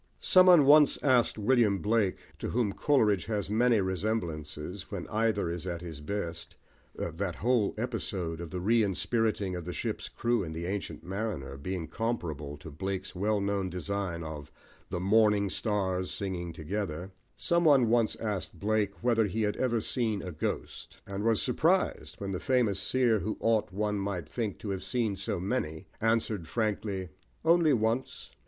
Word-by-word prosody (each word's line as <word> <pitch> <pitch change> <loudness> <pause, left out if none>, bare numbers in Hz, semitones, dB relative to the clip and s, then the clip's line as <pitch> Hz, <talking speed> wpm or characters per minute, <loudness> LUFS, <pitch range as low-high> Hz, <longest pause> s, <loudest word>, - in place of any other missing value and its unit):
Some 185 0 +5
one 175 -6 +8
once 150 +1 +7
asked 130 -5 +3
William 110 -2 +3
Blake, 105 0 +1 0.2
to - - -3
whom 115 -4 0
Coleridge 110 - +2
has 105 -3 -2
many 115 0 +4
resemblances, 90 -3 -3
when 100 -4 -5
either 110 -5 +1
is 85 +1 -5
at 85 -1 -3
his 80 -4 -7
best 85 -1 -4 0.4
(that 85 +2 -3
whole 115 -2 +1
episode 95 -8 -2
of 85 - -6
the 90 - -4
re 115 +5 +3
inspiriting 105 -1 0
of 90 - -5
the 90 +2 -5
ship's - - -3
crew 120 -1 0
in 80 -2 -5
The 85 +2 -4
Ancient 95 -5 -4
Mariner 95 -8 -4
being 85 +4 -4
comparable 80 - -3
to 80 - -10
Blake's 95 +5 -4
well 105 +3 +1
known 100 -1 -1
design 90 -1 -3
of 75 -1 -7 0.4
the 90 - -2
"Morning 105 +1 +3
Stars 95 -4 -1
singing 90 -3 -3
together") 90 +2 -4 0.6
whether 110 - +1
he 110 +4 -2
had 105 0 0
ever 120 -3 +1
seen 110 -3 0
a 90 - -5
ghost, 80 - -4
and 100 +1 -4
was 115 -1 +2
surprised 165 +9 +1
when 100 -1 -4
the 90 - -2
famous 120 -7 +1
seer, 120 -3 +2
who 105 +4 -3
ought, 110 -5 +1
one 105 +1 -1
might 95 -5 -3
think, 110 +2 -3
to 105 - -3
have 95 -1 -3
seen 115 -5 0
so 95 -1 -2
many, 90 -6 -2 0.2
answered 110 -5 +1
frankly, 100 0 -2 0.4
"Only 165 -2 +5
once!" 115 +3 -1
100 Hz, 155 wpm, -30 LUFS, 90-115 Hz, 0.6 s, one